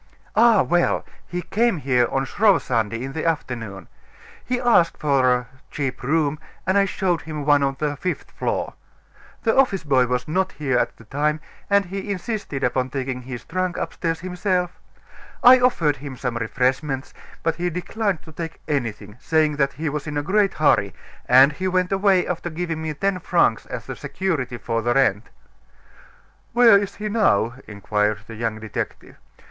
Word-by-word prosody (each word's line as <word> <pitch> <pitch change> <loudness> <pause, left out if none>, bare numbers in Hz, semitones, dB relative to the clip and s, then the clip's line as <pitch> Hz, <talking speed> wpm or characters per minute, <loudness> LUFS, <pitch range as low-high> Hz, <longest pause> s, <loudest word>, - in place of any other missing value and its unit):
"Ah, 230 -3 +6
well! 175 0 +1 0.2
he 180 0 -4
came 220 +2 +1
here 125 -4 +2
on 135 0 0
Shrove 200 - +3
Sunday, 115 -1 -1
in 135 +1 -5
the 160 - -3
afternoon. 115 - -3 0.6
He 250 0 -1
asked 235 -9 +3
for 140 -4 +2
a 125 -1 0 0.2
cheap 135 -4 -3
room, 150 +2 0 0.3
and 190 - +1
I 200 0 +5
showed 185 -3 -1
him 150 -2 -6
one 145 -1 +4
on 135 -1 0
the 150 -1 -1
fifth 180 +6 -4
floor. - - -2 0.7
The 225 - +2
office 225 -10 +3
boy 130 -4 +3
was 125 0 -1
not 190 +4 0
here 135 -4 -1
at - - -1
the - - -15
time, 150 +6 -1 0.3
and 200 0 +4
he 195 +3 -6
insisted 195 - -4
upon 125 +1 0
taking 130 -1 -3
his 125 -1 -8
trunk 185 0 -2
upstairs 165 -1 -3
himself. 180 0 -1 0.7
I 255 +1 +9
offered 170 - +2
him 135 -1 -8
some 125 -1 -3
refreshments; 130 +4 -1 0.3
but 165 0 0
he 175 +1 -1
declined 185 +2 -2
to 160 - -13
take 165 +1 -6
anything, 110 -7 -3
saying 155 -1 +1
that 140 -1 +1
he 160 +2 -4
was 150 +1 -3
in 150 -1 -3
a 145 - -1
great 195 +4 +2
hurry; 100 - +2 0.3
and 130 +4 +7
he 185 +6 -3
went 185 0 +1
away 195 -2 +3
after 175 0 -3
giving 165 -1 -3
me 155 -1 -3
ten 195 +3 0
francs 170 -10 +1
as - - -6 0.2
security 155 -10 -2
for 115 0 -2
the 120 +2 0
rent." 110 -6 +2 1.2
"Where 235 -2 +7
is 200 -1 +1
he 215 - -4
now?" 160 - +2
inquired 105 0 -1
the 115 - -10
young 110 -1 -3
detective. 110 -1 -6
150 Hz, 175 wpm, -22 LUFS, 125-185 Hz, 1.2 s, I